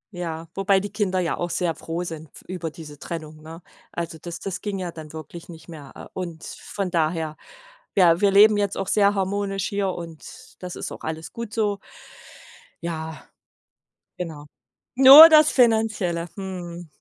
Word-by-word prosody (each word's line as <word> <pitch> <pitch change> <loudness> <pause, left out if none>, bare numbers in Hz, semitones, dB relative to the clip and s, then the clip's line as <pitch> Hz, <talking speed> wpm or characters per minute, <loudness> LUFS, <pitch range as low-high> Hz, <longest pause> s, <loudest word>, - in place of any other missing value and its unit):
Ja, 165 -2 -5
wobei 195 0 +2
die 200 +1 -6
Kinder 190 -4 0
ja 170 - -2
auch 175 - -3
sehr 175 -2 -1
froh 165 +3 -5
sind 160 -2 -8
f - - -14
über 175 -3 -5
diese 150 -2 -12
Trennung, 155 -2 -7
ne? 165 +2 -11 0.3
Also 165 -1 -5
das 170 -1 -7
das 195 -2 -5
ging 205 -2 -4
ja 180 -2 -4
dann 155 -2 -11
wirklich 160 +2 -10
nicht 165 0 -12
mehr, 150 -5 -11
äh. - - -10
Und 170 -3 -6
von 195 -3 -6
daher 160 -2 -1 0.6
ja, 175 -2 +4
wir 200 -1 +4
leben 210 +2 +6
jetzt 200 -1 -1
auch 195 - -3
sehr 205 -1 +3
harmonisch 195 0 -2
hier, 200 -1 -1
und 170 -3 -7 0.4
das 180 -1 -7
ist - - -6
auch - - -9
alles 160 -1 -5
gut 235 -1 -7
so. 205 -3 0 1.0
Ja, 160 -2 -5 1.0
genau. 160 -4 -7 0.5
Nur 270 +5 +11
das 310 -1 +6
Finanzielle. 220 -8 +1
Mhm. 175 -3 -7
175 Hz, 170 wpm, -23 LUFS, 165-200 Hz, 1.0 s, Nur